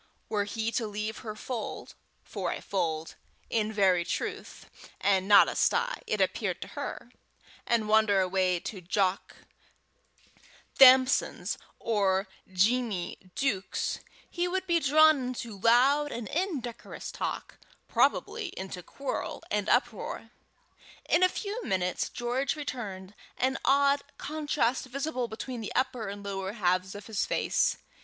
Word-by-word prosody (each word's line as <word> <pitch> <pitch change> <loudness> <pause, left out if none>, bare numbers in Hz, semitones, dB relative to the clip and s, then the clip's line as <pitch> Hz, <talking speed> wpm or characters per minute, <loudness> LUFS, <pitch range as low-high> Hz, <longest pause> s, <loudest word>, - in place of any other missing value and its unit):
Were 205 -2 0
he 220 +2 -2
to 230 -1 -1
leave 210 +1 -4
her 215 -3 -6
fold 230 0 -5 0.3
for - - -3
a - - -4
fold 165 -4 -2 0.4
in 220 -2 +1
very 190 -4 +3
truth, - - -5 0.3
and 195 -1 +2
not 200 -1 +8
a - - -2
sty, 480 +1 +1
it - - -1
appeared - - 0
to - - -11
her - - -6 0.6
and 230 -2 +2
wander 215 -2 +4
away 185 -1 +1
to 195 -4 -6
Jock 185 +2 0 1.4
Thamson's 260 0 +5 0.2
or 200 -3 +1 0.2
Jeemie 195 -2 0
Deuk's, 205 -9 -1 0.3
he 350 0 -1
would 375 +1 -2
be 340 -2 +2
drawn 310 0 +5
into 235 -5 -6
loud 265 +7 +4
and 235 -3 -5
indecorous 300 - -4
talk, - - -5 0.3
probably 445 -4 +1
into 190 -1 -6
quarrel 225 +1 -5
and 205 -1 0
uproar. 240 -1 0 0.8
In 335 - +3
a 370 - +6
few 425 +5 -4
minutes 180 - -1
George 245 +4 -1
returned, 205 -10 -6 0.2
an 265 +1 0
odd 280 +1 +4 0.2
contrast 290 -5 -1
visible 265 -1 -2
between 230 +2 -6
the 215 - -6
upper 255 -4 0
and 200 0 -7
lower 195 -1 -4
halves 185 -2 0
of 205 - -8
his 215 -3 -1
face. - - +1
225 Hz, 135 wpm, -29 LUFS, 195-270 Hz, 1.4 s, not